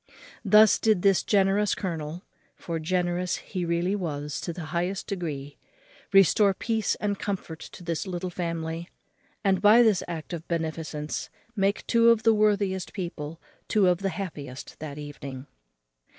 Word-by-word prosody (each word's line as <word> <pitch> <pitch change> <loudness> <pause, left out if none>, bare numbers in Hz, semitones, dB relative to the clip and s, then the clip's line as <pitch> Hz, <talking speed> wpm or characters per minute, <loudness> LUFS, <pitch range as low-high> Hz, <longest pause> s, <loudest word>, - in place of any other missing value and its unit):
Thus 215 0 +6
did 215 -5 +2
this 195 -2 +4
generous 200 0 +2
colonel 165 -1 -4 0.3
(for 165 -1 -4
generous 180 +1 0
he 185 -3 -4
really 170 +3 0
was 150 -6 -3
to 170 - -3
the 170 -1 -7
highest 180 +3 -1
degree) 145 -7 -5 0.5
restore 195 +1 +5
peace 225 0 0
and 205 -1 -2
comfort 185 -5 -4
to 175 - -11
this 170 +2 -3
little 180 0 -4
family; 165 -1 -4 0.5
and 190 -2 +2
by 215 +4 +7
this 215 -5 +3
act 170 0 -6
of 165 -1 -6
beneficence 160 -2 -3 0.3
make 200 0 +1
two 235 0 +5
of 230 -1 +4
the 225 0 +5
worthiest 200 -3 +1
people 165 -4 -5 0.3
two 205 -3 +3
of 180 -1 +3
the 195 0 -1
happiest 145 -10 -7
that 150 -2 -6
evening. 140 -3 -7
180 Hz, 150 wpm, -27 LUFS, 160-200 Hz, 0.5 s, by